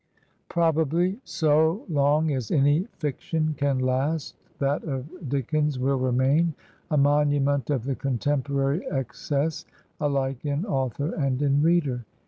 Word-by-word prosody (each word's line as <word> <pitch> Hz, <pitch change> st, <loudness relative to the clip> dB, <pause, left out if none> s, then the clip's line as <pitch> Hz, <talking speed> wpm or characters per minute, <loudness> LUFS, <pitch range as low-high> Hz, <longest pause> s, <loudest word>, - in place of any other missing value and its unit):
Probably 170 Hz, -, +1 dB
so 160 Hz, +5 st, +2 dB
long 150 Hz, 0 st, +2 dB
as 130 Hz, -6 st, -2 dB
any 145 Hz, +4 st, +3 dB
fiction 155 Hz, +2 st, -2 dB
can 140 Hz, -1 st, 0 dB
last 135 Hz, +4 st, -1 dB, 0.2 s
that 140 Hz, +1 st, 0 dB
of 150 Hz, +2 st, -6 dB
Dick 135 Hz, +1 st, -2 dB
ens 150 Hz, -2 st, +1 dB
will 135 Hz, +1 st, +1 dB
remain 135 Hz, +6 st, +2 dB, 0.3 s
a 150 Hz, -, +1 dB
monument 145 Hz, -1 st, +2 dB
of 135 Hz, -6 st, 0 dB
the 135 Hz, +2 st, -1 dB
contemporary 140 Hz, -, -1 dB
ex 135 Hz, -4 st, -4 dB
cess 150 Hz, 0 st, 0 dB, 0.4 s
alike 135 Hz, -3 st, -1 dB
in 145 Hz, +4 st, -1 dB
author 135 Hz, -, -1 dB
and 135 Hz, -5 st, 0 dB
in 140 Hz, 0 st, +3 dB
reader. 150 Hz, -7 st, +2 dB
145 Hz, 130 wpm, -25 LUFS, 135-155 Hz, 0.4 s, any